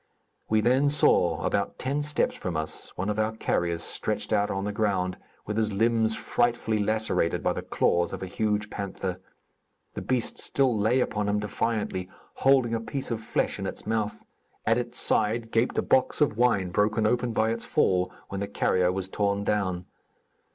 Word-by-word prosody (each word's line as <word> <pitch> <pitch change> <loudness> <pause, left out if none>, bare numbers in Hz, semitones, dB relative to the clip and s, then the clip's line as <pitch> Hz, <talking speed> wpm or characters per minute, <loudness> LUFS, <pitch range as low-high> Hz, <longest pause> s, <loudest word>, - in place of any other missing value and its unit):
We 110 0 +3
then 130 +5 +3
saw, 90 - +3
about - - -1
ten 140 +3 -1
steps 150 0 0
from 90 -4 -3
us, 80 0 -5
one 90 - -2
of 105 0 -1
our 110 +1 +1
carriers 85 -4 0
stretched - - -2
out 100 0 +2
on 95 0 -2
the 105 - -2
ground, 95 -4 0 0.3
with 105 +1 -3
his 110 -1 +1
limbs 110 +1 +2
frightfully 120 -2 0
lacerated 110 -5 0
by - - +2
the - - -4
claws 85 0 +1
of - - -5
a - - -2
huge 105 +2 -1
panther. 95 -2 -4 0.7
The - - -5
beast 125 -2 -1
still 135 -4 +2
lay 110 +5 +2
upon 105 -3 -1
him 105 - +1
defiantly, 105 -3 -2 0.2
holding 130 -3 +3
a 115 - +1
piece 130 +3 -5
of 115 -1 -2
flesh - - -1
in - - -3
its - - -7
mouth. 110 -7 -2 0.4
At 115 +2 +3
its 120 0 -4
side, 115 +1 +1
gaped 115 +2 +1
a - - +2
box 130 - +2
of 145 -8 +3
wine 110 -6 +2
broken 105 +4 +2
open 120 +2 +1
by 110 0 +1
its 115 0 -3
fall 90 -1 +2 0.2
when 100 - -4
the 100 - -2
carrier 90 -2 +1
was 95 0 -3
torn 100 +1 0
down. 95 -4 -1
110 Hz, 185 wpm, -27 LUFS, 95-115 Hz, 0.7 s, We